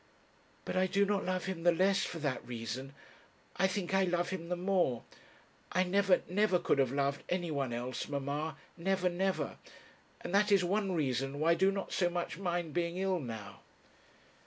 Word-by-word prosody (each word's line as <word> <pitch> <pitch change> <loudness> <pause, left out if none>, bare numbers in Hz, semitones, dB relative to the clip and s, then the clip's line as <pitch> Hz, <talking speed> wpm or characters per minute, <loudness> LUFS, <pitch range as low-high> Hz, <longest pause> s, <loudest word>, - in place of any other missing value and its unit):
'But - - -3
I 185 0 +3
do 200 +2 +3
not 200 -1 0
love 185 0 -1
him 185 -3 -3
the 175 +1 +5
less 190 +3 +3
for 170 - -4
that 145 -5 -2
reason; 125 +3 -5 0.6
I 190 - +4
think 190 -1 -3
I 195 0 +4
love 175 -1 0
him 170 -3 -5
the 180 - 0
more. 180 -9 +1 0.7
I 185 - +3
never, 190 0 +3
never, 195 +1 +3
could 170 -5 +1
have 130 -3 +3
loved 140 0 0
anyone 155 -8 -1
else, 120 +2 -3
mamma; 145 +2 -3 0.2
never, 185 +1 +1
never; 190 +2 -1 0.6
and - - -5
that 205 +1 +4
is 195 -2 +5
one 195 +1 0
reason 135 -3 -1
why 160 +2 +4
I - - +7
do 190 +3 +3
not 195 -1 -4
so 175 -2 +2
much 175 0 -3
mind 175 -4 -2
being 170 0 -1
ill 190 -1 +1
now.' 115 -7 -7
175 Hz, 185 wpm, -33 LUFS, 145-190 Hz, 0.7 s, I